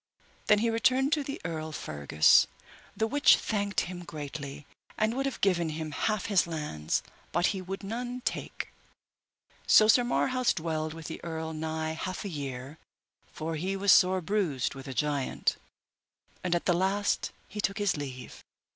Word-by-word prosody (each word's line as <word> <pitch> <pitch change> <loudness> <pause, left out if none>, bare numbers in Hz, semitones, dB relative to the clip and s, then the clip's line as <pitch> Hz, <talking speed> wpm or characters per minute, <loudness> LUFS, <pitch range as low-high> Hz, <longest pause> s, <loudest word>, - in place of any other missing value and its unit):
Then 210 - +6
he 230 - +2
returned 260 +5 +3
to 300 -3 +1
the 275 0 -5
Earl 155 -1 -3
Fergus, 75 - +4 0.5
the 220 - +2
which 285 +6 +6
thanked 200 -3 -1
him 175 0 -6
greatly, 145 -2 -7 0.3
and 215 +1 +2
would 270 +2 -1
have 270 - -4
given 175 -4 +2
him 155 0 -4
half 215 +6 -1
his 195 -4 +3
lands, 150 - -2 0.3
but 175 +1 +2
he 190 - -4
would 195 +2 -6
none 245 +4 -4
take. - - -3 1.0
So 215 - +7
Sir 245 +3 +6
Marhaus 255 +1 +1
dwelled 155 -2 -2
with 165 -1 -9
the - - -7
earl 160 -1 -4
nigh 160 0 -2
half 185 +6 -4
a - - -2
year, 140 -2 -6 0.5
for 160 0 -4
he 185 +5 -2
was 195 0 +3
sore 185 0 +5
bruised 165 -8 0
with 135 0 -9
the 135 - -6
giant, 145 0 0 0.9
and 175 -1 +1
at 170 - -1
the 180 - +4
last 195 +3 +1 0.2
he 210 - -4
took 195 0 -1
his 205 -3 +1
leave. 135 -4 -7
175 Hz, 165 wpm, -29 LUFS, 155-210 Hz, 1.0 s, So